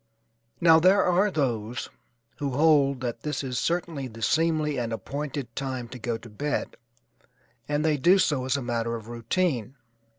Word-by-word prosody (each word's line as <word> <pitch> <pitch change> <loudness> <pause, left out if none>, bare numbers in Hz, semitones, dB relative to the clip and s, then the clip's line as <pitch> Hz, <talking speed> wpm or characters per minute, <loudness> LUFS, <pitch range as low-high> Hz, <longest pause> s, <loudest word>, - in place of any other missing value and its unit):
Now 165 -1 +7
there 185 +4 +5
are 185 +4 +3
those 120 - -2 0.5
who 140 -2 -2
hold 140 -2 +3
that 120 -2 -4
this 150 0 -3
is 125 -2 -2
certainly 165 -5 -2
the 115 -1 -9
seemly 155 -2 +1
and 115 -1 -2
appointed 140 0 -5
time 130 -3 -3
to 125 - -9
go 115 0 -2
to 115 - -13
bed 145 +7 -3 0.9
and 150 +1 0
they 155 -2 +2
do 175 +8 +5
so 145 -8 +1
as 130 +2 +1
a 140 - -4
matter 115 -1 -1
of 115 0 -8
routine. 125 - -1
135 Hz, 165 wpm, -26 LUFS, 120-155 Hz, 0.9 s, Now